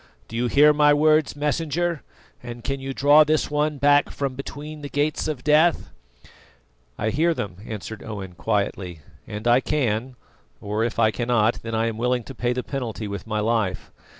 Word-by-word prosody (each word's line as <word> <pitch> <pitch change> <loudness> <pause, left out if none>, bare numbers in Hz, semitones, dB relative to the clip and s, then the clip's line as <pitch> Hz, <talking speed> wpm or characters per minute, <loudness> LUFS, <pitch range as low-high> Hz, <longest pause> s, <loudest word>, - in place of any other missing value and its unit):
Do 115 - -9
you 120 +1 0
hear 150 +4 +5
my 150 0 +5
words, 155 0 +3
Messenger, 160 +2 -1 0.4
and 120 -1 -8
can 135 +2 -2
you 135 0 -5
draw 145 +3 +6
this 155 0 0
one 150 0 0
back 145 +1 +4
from 140 -2 -3
between 145 +3 -8
the 145 - -6
Gates 145 +2 -1
of 150 -5 -4
Death?" 155 +3 +3 1.1
"I 110 - -1
hear 165 +5 +2
them," 95 -9 -5
answered 110 0 -7
Owen 100 -4 -7
quietly; 90 -2 -2 0.3
"and 105 +2 -5
I 120 +1 +5
can 130 -3 -1 0.4
or 105 +2 -2
if 115 0 -2
I 110 -1 +4
cannot, 120 -1 +1
then 115 0 -4
I 110 +1 +1
am 115 -1 -3
willing 125 0 0
to 135 - -9
pay 120 0 -1
the 125 0 -2
penalty 115 -6 -4
with 100 +2 -6
my 110 -1 -1
life. 110 -3 -1
125 Hz, 180 wpm, -23 LUFS, 110-150 Hz, 1.1 s, draw